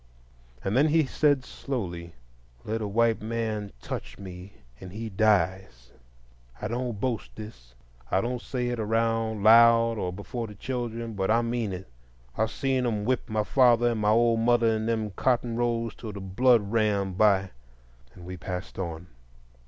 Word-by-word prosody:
And 100 +3 -1
then 140 +4 +5
he 155 0 +3
said 140 -1 +2
slowly: 90 -10 -5 0.5
"Let 110 +1 -2
a 105 - -2
white 115 +2 +2
man 110 -2 -3
touch - - -6
me, 95 0 -10 0.3
and 95 -1 -9
he 110 +3 -5
dies; 95 - 0 0.7
I - - -3
don't 120 -3 -3
boast 120 -1 -3
this,—I - - -6
don't 120 +3 -2
say 125 -1 -3
it 120 -1 -3
around 115 -1 0
loud, 115 0 +6
or 90 - -2
before 115 +5 -5
the 105 - -11
children,—but 115 -4 -3
I 115 +2 +3
mean 115 -3 -2
it. 95 0 -7 0.5
I've 110 0 0
seen 130 +1 -1
them 105 -3 -1
whip 130 0 -1
my 110 -1 0
father 120 0 +4
and 110 -2 -2
my 105 - +2
old 115 +1 +3
mother 115 -1 +3
in 110 0 -2
them 110 -2 -1
cotton 120 +2 0
rows 115 -1 -1
till 110 -3 -8
the 100 - -7
blood 105 +2 +2
ran; 105 -4 +1
by—" 95 -1 +3 0.6
and 90 - -12
we 90 +1 -7
passed 90 +2 -6
on. 85 -2 -5
110 Hz, 160 wpm, -27 LUFS, 95-120 Hz, 0.7 s, loud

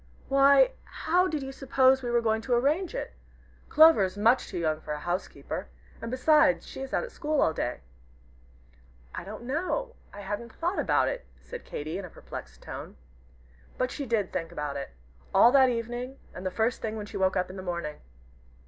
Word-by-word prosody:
"Why, 280 - +6 0.3
how 360 +3 +4
did 305 -5 -2
you 270 - -5
suppose 265 0 +3
we 245 - -3
were 240 0 +2
going 220 -1 +1
to 245 +1 +1
arrange 305 - +1
it? - - -4 0.6
Clover 315 -8 +7
is 190 +1 -2
much 230 +5 +3
too 185 - -6
young 155 -2 0
for 150 - -4
a - - -6
housekeeper. 175 +4 -4 0.3
And 230 - -4
beside, 270 +3 +4
she - - -9
is 270 - -6
at - - -1
school 305 -1 -1
all 160 - +3
day." 120 - -3 1.3
"I - - -5
don't 210 +5 -8
know 365 - -2 0.2
I 205 - -9
hadn't 205 +4 -5
thought 350 +3 -2
about - - +2
it," - - -4
said 485 - -9
Katy, 155 +5 -5
in 195 - -6
a - - -9
perplexed 60 - -10
tone. - - -8 0.8
But 255 0 0
she 280 -3 -5
did 220 -5 0
think 165 -2 -3
about 150 -3 -4
it 140 -1 -4 0.5
all 240 - +8
that 265 -1 +6
evening, 240 +3 -4 0.2
and 185 +1 -5
the - - +1
first 220 +7 0
thing 220 -1 -3
when 210 - -5
she - - -7
woke 190 0 +2
in 185 0 -1
the 190 - -6
morning. 170 -5 -4
240 Hz, 195 wpm, -28 LUFS, 185-275 Hz, 1.3 s, all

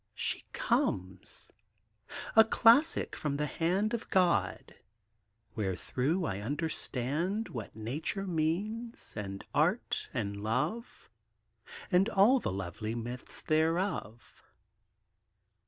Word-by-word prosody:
She - - -2
comes! 95 0 -2 0.8
a 220 - +10
classic 230 +7 +4
from 145 -2 -2
the 150 - 0
hand 180 - 0
Of 235 - -3
God! 170 - +1 0.8
wherethrough 125 - -1
I 95 -9 -2
understand 155 - -2
What 115 -5 -7
Nature 145 - -3
means 195 +8 -2
and 100 -2 -5
Art - - +1
and 100 0 -3
Love, 125 - -2 0.8
And 190 +4 +4
all 225 +5 +5
the - - -2
lovely 100 +4 -4
Myths 120 +2 -6
thereof. 160 - -1
155 Hz, 95 wpm, -31 LUFS, -, 0.8 s, a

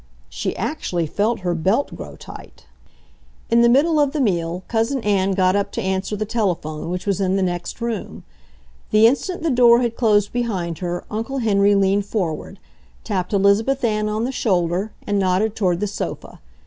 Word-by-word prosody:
She - - -3
actually 170 -2 -2
felt 210 +8 -1
her 175 -1 -1
belt 190 - 0
grow - - -9
tight. - - -13 0.9
In 235 0 +5
the 235 - +5
middle 300 +6 +3
of 285 -2 +2
the 305 - -1
meal 175 -6 0
Cousin 230 +4 0
Ann 195 -2 +1
got 185 0 +2
up 200 0 0
to 230 - -2
answer 190 +2 -1
the 215 +1 -2
telephone, 175 -9 -2
which 180 +1 -4
was 200 -1 0
in 190 0 +1
the 195 - +1
next 175 +2 -3
room. 235 -2 -4 0.7
The 215 +1 +5
instant 320 +9 +1
the 330 - +1
door 240 -1 +6
had 235 -2 -1
closed 210 -4 +2
behind 190 -9 -2
her 175 -1 -3
Uncle 225 +6 -3
Henry 205 -4 +3
leaned 195 +1 +2
forward, 190 -2 -3 0.5
tapped 185 -5 -2
Elizabeth 210 +7 +2
Ann 215 -2 +1
on 215 +1 -1
the 255 - -1
shoulder, 185 -3 0
and 205 -1 0
nodded 195 +3 +1
toward 180 -4 +1
the 210 - 0
sofa. 205 - -6
205 Hz, 180 wpm, -21 LUFS, 185-230 Hz, 0.9 s, door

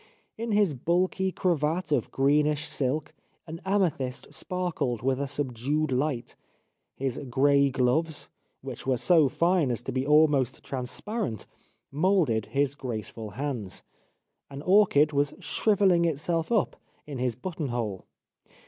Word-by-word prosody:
In 230 +1 -4
his 205 -6 +3
bulky 185 +7 0
cravat 165 -2 0
of 135 -6 +1
greenish 150 +2 +2
silk 140 +3 -1 0.3
an 165 +1 -8
amethyst 170 -10 -1
sparkled 160 - -2
with 135 +1 +1
a 140 - -1
subdued 140 +2 -1
light; 130 -2 -1 0.6
his 135 -2 -3
grey 140 +2 +4
gloves, 135 +5 0 0.3
which - - -8
were 130 -2 +2
so 160 +1 +4
fine 170 -1 +2
as 120 -1 -2
to 130 - -4
be 130 0 -1
almost 145 -3 +3
transparent, 135 - -3 0.5
moulded 150 - +2
his 140 0 0
graceful 115 -4 -5
hands; 115 -4 -4 0.7
an 140 +1 -8
orchid 180 -6 +4
was 145 0 +1
shrivelling 195 -5 +2
itself 165 +2 -1
up 220 -5 +1 0.3
in 145 -4 -6
his 125 -2 0
button 155 +3 -4
hole. 115 -6 -4
145 Hz, 130 wpm, -27 LUFS, 130-170 Hz, 0.7 s, grey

